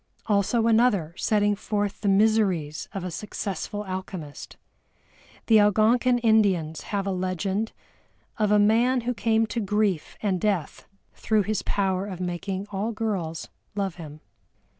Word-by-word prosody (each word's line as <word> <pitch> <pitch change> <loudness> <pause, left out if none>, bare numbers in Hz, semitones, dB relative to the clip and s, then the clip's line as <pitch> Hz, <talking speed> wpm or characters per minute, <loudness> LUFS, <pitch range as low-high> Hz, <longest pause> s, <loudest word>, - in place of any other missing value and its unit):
Also 215 +2 +2
another 220 -8 +3
setting 205 +1 +1
forth 205 0 -2
the 205 - -1
miseries 195 -7 +2
of 195 - -5
a 180 - -4
successful 205 +2 -4
alchemist. 185 -5 -7 0.9
The 225 - +5
Algonkin 225 +5 +4
Indians 195 -9 +2
have 200 -2 -1
a 195 - -1
legend 190 +3 -2 0.7
of 210 -1 +2
a 210 - +5
man 230 +5 +3
who 245 +2 -1
came 225 -1 +2
to 230 - -3
grief 210 -5 -1
and 190 -4 0
death 195 -7 -1 0.3
through 215 -2 +1
his 210 0 -1
power 195 -1 -1
of 185 -3 -6
making 185 +2 -3
all 205 +3 -2
girls 200 -8 -3 0.3
love 195 -4 -2
him. 155 -2 -10
205 Hz, 140 wpm, -25 LUFS, 185-220 Hz, 0.9 s, The